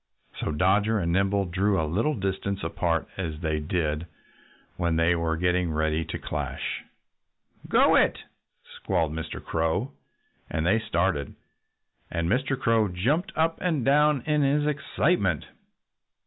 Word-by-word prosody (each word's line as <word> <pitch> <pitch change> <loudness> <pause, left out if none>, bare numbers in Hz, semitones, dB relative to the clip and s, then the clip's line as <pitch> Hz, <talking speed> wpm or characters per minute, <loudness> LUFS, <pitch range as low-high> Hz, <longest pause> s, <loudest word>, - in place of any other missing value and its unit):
So - - -2
Dodger 100 +7 +2
and 85 -4 0
Nimble 95 +2 +2
drew 95 +2 +1
a 80 - +1
little 110 - 0
distance 100 -1 -2
apart, 85 0 -1
as 80 -5 -4
they 80 -2 0
always 75 0 -5
did 80 -2 -1 0.7
when 85 -2 0
they 80 +1 +3
were 80 -1 -1
getting 90 0 +1
ready 80 +1 0
to - - -4
clash. - - -4 0.9
"Go - - +5
it!" - - +4 0.5
squalled 80 -2 -2
Mr. 80 0 -5
Crow. 80 - -1 0.6
And 80 - -1
they 105 +6 +3
started. 85 - -1 0.7
And 85 0 -1
Mr. 130 +6 0
Crow 115 -2 +3
jumped 125 - 0
up 165 +1 +1
and 160 -9 0
down 145 0 +4
in 150 -1 +1
his 145 +1 +2
excitement. 140 - 0
95 Hz, 140 wpm, -26 LUFS, 80-120 Hz, 0.9 s, Go